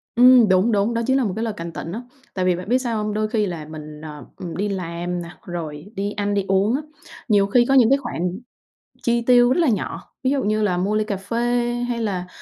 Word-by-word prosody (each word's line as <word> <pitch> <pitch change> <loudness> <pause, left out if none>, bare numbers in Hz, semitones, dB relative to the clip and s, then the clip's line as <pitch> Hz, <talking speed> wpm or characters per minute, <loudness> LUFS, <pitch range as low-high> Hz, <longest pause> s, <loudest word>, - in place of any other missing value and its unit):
Ừm, 245 -3 +7
đúng, 190 +5 +4
đúng. 210 +3 +1
Đó 230 - 0
chính 265 +1 +3
là 265 - +2
một 200 - -1
cái 225 - -2
lời 220 -2 -2
cảnh 170 0 -5
tỉnh 165 - -6
á, 225 +5 -4 0.3
tại 185 -1 -1
vì 180 -1 +3
bạn 180 +4 -7
biết 250 - +4
sao 230 -4 -2
hông? 210 0 -2
Đôi 215 0 0
khi 215 -2 +1
là 170 -5 -5
mình, 150 -1 -9
ờ, 150 -2 -9 0.3
đi 205 +1 -1
làm 175 -1 -3
nè, 170 - -8 0.2
rồi 160 -3 -6
đi 200 +1 -2
ăn 205 0 -2
đi 200 -1 0
uống 195 +5 +2
á, 290 - -1 0.5
nhiều 205 -3 +4
khi 240 +4 +4
có 270 - +2
những 245 -4 +6
cái 275 - +5
khoản 180 -8 -3 0.6
chi 235 0 +1
tiêu 245 +1 +5
rất - - +1
là 320 - +3
nhỏ, 215 - -3
ví 260 - +3
dụ 280 -2 +1
như 215 +1 +1
là 185 -4 +1
mua 195 +4 0
ly 215 - +1
cà 205 -2 -2
phê 230 +5 -4 0.5
hay 235 -1 -2
là, 190 -5 -2
205 Hz, 255 wpm, -22 LUFS, 180-235 Hz, 0.6 s, Ừm